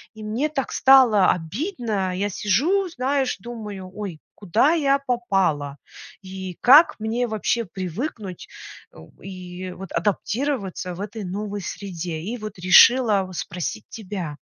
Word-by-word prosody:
И 215 - -10
мне 235 +8 -1
так 270 -3 -3
стало 250 -8 +6
обидно, 210 - -3
я 205 +1 -1
сижу, 325 - +1
знаешь, 265 -3 -1
думаю: 210 -4 -8
ой, 195 -7 -6 0.2
куда 220 - +2
я 280 -4 +2
попала? 195 - -1 0.4
И 190 -2 -8
как 290 +7 +7
мне 230 +3 -1
вообще 220 +2 -1
привыкнуть, 190 - -6 0.5
о, 80 - -14
и 185 -1 -8
вот 195 -1 -10
адаптироваться 205 -3 -2
в - - -11
этой 210 +1 -6
новой 205 +2 -4
среде? 175 -4 -5
И 225 +8 -4
вот 215 -4 -8
решила 210 +3 +6
в 185 - -11
спросить 180 +6 -5
тебя. 185 -8 -6
205 Hz, 130 wpm, -23 LUFS, 185-245 Hz, 0.5 s, как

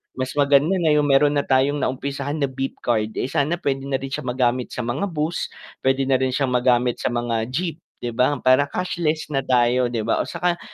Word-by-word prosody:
Mas 130 0 -3
maganda 145 +2 +4
na 155 -3 +3
yung 145 -1 +2
meron 145 +2 +4
na 145 - +2
tayong 135 +2 +2
naumpisahan 140 +3 -3
na 140 - +1
beep 135 0 -5
card 110 -2 0
eh, - - -1
sana 160 +4 0
pwede 135 -4 -1
na 135 -1 -2
rin 135 - -5
siya - - -3
magamit 125 0 0
sa - - -6
mga 125 +12 -2
bus, 160 +1 -2 0.3
pwede 135 0 +2
na 135 - +3
rin 130 0 +1
siyang 130 0 0
magamit 125 -1 +2
sa - - +2
mga 120 -2 -1
jeep, 165 +5 -3 0.2
'di 120 - -2
ba, 125 +5 +2
para 130 +2 +4
cashless 160 -3 -2
na 135 - +1
tayo, 125 -1 +2
'di 115 -3 -3
ba 115 - 0
o - - -1
'tsaka 175 0 -1
135 Hz, 220 wpm, -22 LUFS, 125-145 Hz, 0.3 s, maganda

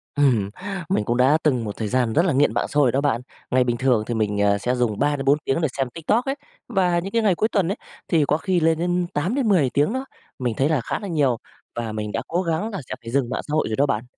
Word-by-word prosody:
Ừm, 120 -9 +3 0.4
mình 105 - +1
cũng 120 +1 0
đã 135 +5 +5
từng 130 -6 +2
một 105 -1 -5
thời 110 - -2
gian 120 0 +1
rất 165 +4 +3
là 165 - +2
nghiện 145 +2 +3
mạng - - 0
xã 150 - -4
hội 130 -4 +4
đó 135 +3 +1
bạn. 125 -5 +1 0.3
Ngày 130 0 +4
bình 120 -1 -1
thường 125 -3 +2
thì 120 - -1
mình, 105 -2 0
ờ, 100 0 +3
sẽ 125 +5 -1
dùng 115 -4 0
3-4 145 0 +2
tiếng 135 +5 0
để 160 - +2
xem 135 -2 0
TikTok 170 - 0
ấy, 270 - -1 0.3
và 180 -6 +2
những 200 +5 -1
ngày 195 -4 +3
cuối 220 +6 +1
tuần 195 -5 +1
ấy 205 - -3 0.3
thì 160 -4 +3
có 150 - +2
khi 185 +1 0
lên 160 0 +2
đến 175 +1 0
8-10 185 - +2
tiếng 145 - +1
đó. 260 +1 -3 0.3
Mình 120 -3 -1
thấy 140 +3 +2
là 150 -6 +1
khá - - -3
là 205 - -6
nhiều, 145 -9 +1 0.4
và 115 -2 -3
mình 105 -1 -4
đã 115 - -2
cố 175 +2 0
gắng 170 +5 -1
là 200 - -5
sẽ - - -3
phải 115 0 -8
dừng 130 -2 +1
mạng - - -2
xã - - -6
hội 155 - +2
rồi 110 - -1
đó 140 - +3
bạn. 115 -5 -1
145 Hz, 275 wpm, -23 LUFS, 120-175 Hz, 0.4 s, đã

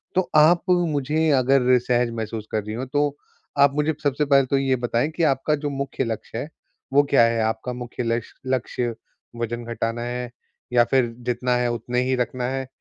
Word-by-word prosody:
तो 185 - +1
आप 160 +3 +6
मुझे, 160 -3 +1
अगर 130 -2 +4
सहज 120 0 +1
महसूस 110 -1 -5
कर 110 -2 -1
रही 105 +1 -6
हों, 130 +3 -3
तो 145 +1 0 0.4
आप 140 0 +5
मुझे 150 +1 +1
सबसे 145 +1 +1
पहले 140 -2 +4
तो 135 +1 +1
ये 135 -1 +2
बताएँ 120 +3 0
कि 170 - 0
आपका 145 +1 +2
जो 145 0 -3
मुख्य 135 -1 -3
लक्ष्य 115 -1 -5
है, 145 - -4 0.4
वो 145 +1 +6
क्या 125 -4 +6
है? 115 0 +1
आपका 110 +3 -2
मुख्य 125 0 -5
लक्ष 115 0 -2
लक्ष्य 125 -2 -1 0.4
वज़न 120 0 -3
घटाना 115 +1 -2
है, 120 0 -4 0.4
या 120 - +6
फिर 125 -3 +2
जितना 125 0 0
है 125 0 +1
उतने 125 +1 -1
ही 130 0 +1
रखना 125 0 -2
है, 135 -1 -3
125 Hz, 190 wpm, -23 LUFS, 120-140 Hz, 0.4 s, आप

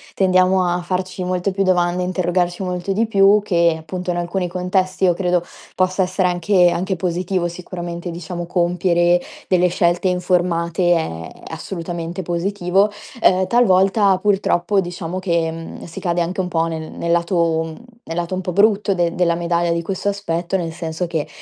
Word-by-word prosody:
tendiamo 185 0 +3
a 175 0 0
farci 185 +1 -3
molte 180 +2 -1
più 195 +1 -2
domande, 180 -1 +2
a 180 - -1
interrogarci 175 0 0
molto 180 +1 -2
di 225 +4 +1
più 200 -1 +4
che, 170 -4 +2
appunto, 180 +3 -6
in 175 - 0
alcuni 175 +1 -2
contesti 185 +1 -1
io 180 -2 +5
credo 180 -1 0 0.3
possa 185 +1 +1
essere 185 0 +1
anche 180 0 +3
anche 185 +2 -1
positivo 180 +1 -1
sicuramente, 175 0 -6
diciamo, 175 0 -6
compiere 175 0 +2 0.3
delle 180 -1 +3
scelte 175 +1 +1
informate, 175 -1 +1
è 80 - -3 0.2
assolutamente 170 0 -5
positivo. 180 +3 +1 0.3
Uhm, 185 -2 +4
talvolta 195 -3 +4
purtroppo, 195 -1 +1
diciamo, 175 0 -5
che, 170 -3 0
mhmm, 165 0 -8
si 165 - -8
cade 175 -1 0
anche 180 +3 -1
un 180 - -3
po' 165 -2 0
nel 160 -1 -5
nel 170 - -3
lato 170 -1 +1
mhmm, 160 -1 -8 0.3
nel 165 - -5
lato 175 +1 -2
un 185 - -2
po' 180 - -3
brutto 200 +1 +3
de 170 -1 +1
della 170 -2 +2
medaglia 170 0 0
di 170 0 -1
questo 195 +3 -2
aspetto, 180 -2 -2
nel 170 -3 -3
senso 165 +1 -4
che, 165 -3 -3
180 Hz, 170 wpm, -20 LUFS, 170-185 Hz, 0.3 s, io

